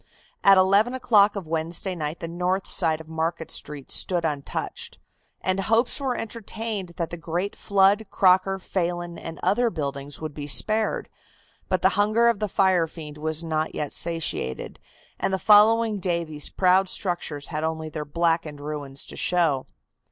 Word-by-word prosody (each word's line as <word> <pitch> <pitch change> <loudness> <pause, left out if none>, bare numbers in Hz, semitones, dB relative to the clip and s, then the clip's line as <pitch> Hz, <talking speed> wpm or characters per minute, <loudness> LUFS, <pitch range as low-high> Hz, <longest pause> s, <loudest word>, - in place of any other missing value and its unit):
At 195 -1 +7
eleven 200 +6 +4
o'clock 215 -5 +4
of 200 -3 -5
Wednesday 165 +4 -2
night 155 -2 -4
the 165 - -3
north 180 +3 -1
side 160 -1 +2
of 160 - -11
Market 160 +1 -3
Street 145 -2 -4
stood 175 -3 +1
untouched, 315 - -4 0.4
and 185 0 0
hopes 225 +6 +1
were 265 -3 -1
entertained 220 -4 -5
that 170 -3 -3
the 175 - -5
great 175 +4 -3
Flood, 200 +2 +3
Crocker, 190 +1 +3
Phelan 175 -2 -3
and 165 -2 -8
other 240 +3 +2
buildings 140 -5 -4
would 155 -2 -5
be 145 0 -6
spared, 215 - +2 0.6
but 185 -2 0
the 190 - +6
hunger 215 +3 +4
of 230 -4 0
the 210 -1 -2
fire 185 -3 +3
fiend 150 -2 -10
was 160 +1 -1
not 155 -1 -2
yet 150 - -3
satiated, 165 - -2 0.4
and - - 0
the 190 - +1
following 215 +1 +5
day 175 -2 0
these 155 -2 -5
proud 185 0 +3
structures 170 -6 -2
had 155 -1 -3
only 160 0 -2
their 155 -1 -5
blackened 165 -1 0
ruins 145 -2 -5
to - - -8
show. 165 -7 +1
175 Hz, 165 wpm, -25 LUFS, 155-200 Hz, 0.6 s, At